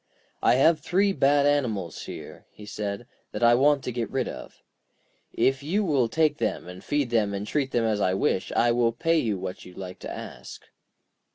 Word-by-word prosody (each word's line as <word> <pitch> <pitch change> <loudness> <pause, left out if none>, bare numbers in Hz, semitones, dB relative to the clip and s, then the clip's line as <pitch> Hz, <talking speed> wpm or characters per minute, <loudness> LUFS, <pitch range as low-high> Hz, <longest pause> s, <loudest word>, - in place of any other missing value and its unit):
'I - - +4
have 155 +5 +4
three 195 +6 +1
bad 140 -3 +3
animals 115 - -1
here,' - - -10
he 105 - -13
said, 105 +2 -5 0.3
'that - - -4
I 120 0 +7
want 140 +2 +3
to 125 - -3
get 115 -3 -3
rid 130 -1 -1
of. - - -9 0.7
If 135 0 +1
you 185 +9 0
will 135 -8 +2
take 155 0 +1
them - - -2
and 90 0 -10
feed 145 -4 -1
them, 105 -4 +1
and 100 +1 -4
treat 135 +3 -1
them 120 -3 0
as 105 -2 0
I 95 -1 +2
wish, 95 -1 0
I 120 - +3
will 120 -1 +2
pay 165 +6 +1
you 110 -8 -1
what 95 0 -6
you 90 - -13
like 90 -1 -8
to - - -7
ask.' - - -9
120 Hz, 200 wpm, -26 LUFS, 105-145 Hz, 0.7 s, I